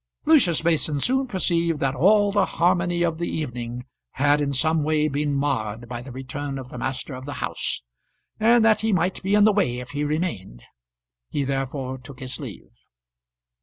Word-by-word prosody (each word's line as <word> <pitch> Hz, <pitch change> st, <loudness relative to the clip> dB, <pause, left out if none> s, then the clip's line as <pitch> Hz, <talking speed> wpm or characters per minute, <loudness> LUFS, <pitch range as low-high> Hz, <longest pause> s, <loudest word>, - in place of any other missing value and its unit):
Lucius 195 Hz, -, +4 dB
Mason 160 Hz, -3 st, +1 dB
soon 265 Hz, -, +1 dB
perceived 170 Hz, -, 0 dB
that 135 Hz, -1 st, 0 dB
all 205 Hz, +6 st, +4 dB
the 200 Hz, -1 st, +2 dB
harmony 175 Hz, 0 st, +2 dB
of 165 Hz, -1 st, -1 dB
the 170 Hz, -, -2 dB
evening 125 Hz, -4 st, -4 dB, 0.3 s
had 145 Hz, +2 st, +3 dB
in 140 Hz, -1 st, 0 dB
some 155 Hz, +4 st, +2 dB
way 155 Hz, 0 st, +1 dB
been 145 Hz, 0 st, -1 dB
marred 120 Hz, -5 st, -1 dB
by 120 Hz, 0 st, -5 dB
the 130 Hz, +1 st, -10 dB
return 135 Hz, +2 st, -5 dB
of 130 Hz, -1 st, -8 dB
the 125 Hz, -, -8 dB
master 130 Hz, +2 st, -4 dB
of 130 Hz, +1 st, -8 dB
the 145 Hz, -, -5 dB
house, -, -, -2 dB, 0.6 s
and 230 Hz, +1 st, +5 dB
that 220 Hz, -1 st, +4 dB
he 220 Hz, 0 st, +1 dB
might 185 Hz, 0 st, 0 dB
be 195 Hz, +2 st, +1 dB
in 210 Hz, -, +6 dB
the 215 Hz, 0 st, +5 dB
way 175 Hz, -12 st, +1 dB
if 125 Hz, 0 st, -7 dB
he 145 Hz, 0 st, -2 dB
remained; 145 Hz, -, -3 dB, 0.7 s
he 145 Hz, -, -1 dB
therefore 135 Hz, -1 st, -3 dB
took 130 Hz, +1 st, -12 dB
his 130 Hz, -1 st, -5 dB
leave. -, -, -9 dB
145 Hz, 185 wpm, -24 LUFS, 130-175 Hz, 0.7 s, in